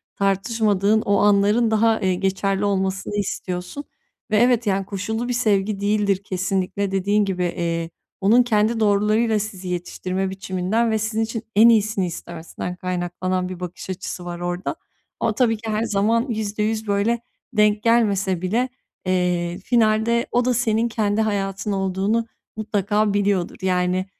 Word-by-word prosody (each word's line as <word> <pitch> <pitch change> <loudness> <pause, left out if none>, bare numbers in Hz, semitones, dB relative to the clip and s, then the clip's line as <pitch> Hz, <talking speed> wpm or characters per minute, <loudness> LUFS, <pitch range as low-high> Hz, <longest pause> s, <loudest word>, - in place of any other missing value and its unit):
tartışmadığın 205 +1 +1
o 200 -1 +1
anların 205 +3 +3
daha, 220 +1 +3
eee, 185 -1 +1
geçerli 195 +1 0
olmasını 195 0 -1
istiyorsun 185 +4 -4 0.5
ve 215 - +4
evet, 240 0 +3
yani 195 -1 +1
koşullu 220 +4 -3
bir 245 - -1
sevgi 210 -4 +1
değildir 200 -1 +1
kesinlikle. 190 +1 -2
Dediğin 200 +2 +2
gibi, 185 -2 -2
eee, 170 -1 -2 0.3
onun 225 +6 +5
kendi 225 -1 +1
doğrularıyla 215 +1 +2
sizi 195 -3 -6
yetiştirme 185 +1 -3
biçiminden 190 +4 -1
ve 220 - +2
sizin 220 +1 -1
için 225 0 -4
en 225 +3 +8
iyisini 215 -3 +2
istemesinden 170 +1 -6
kaynaklanan 180 0 -2
bir 185 -1 -7
bakış 180 +1 -7
açısı 180 -1 -5
var 175 0 -5
orada. 175 - -3 0.4
Ama 220 - 0
tabii 230 -3 +2
ki 220 +1 -7
her 215 +1 0
zaman 225 +2 +1
%100 215 0 -2
böyle, 205 +4 +1 0.3
denk 210 -1 +3
gelmese 200 -6 +2
bile, 230 +8 0 0.4
eee, 180 -1 0
finalde 230 0 +2
o 245 0 +2
da 250 - +2
senin 230 -1 +1
kendi 215 -2 0
hayatın 200 -1 -1
olduğunu 195 +4 0 0.3
mutlaka 210 -1 0
biliyordur. 200 -3 0
Yani, 185 0 +1
205 Hz, 145 wpm, -22 LUFS, 185-220 Hz, 0.5 s, en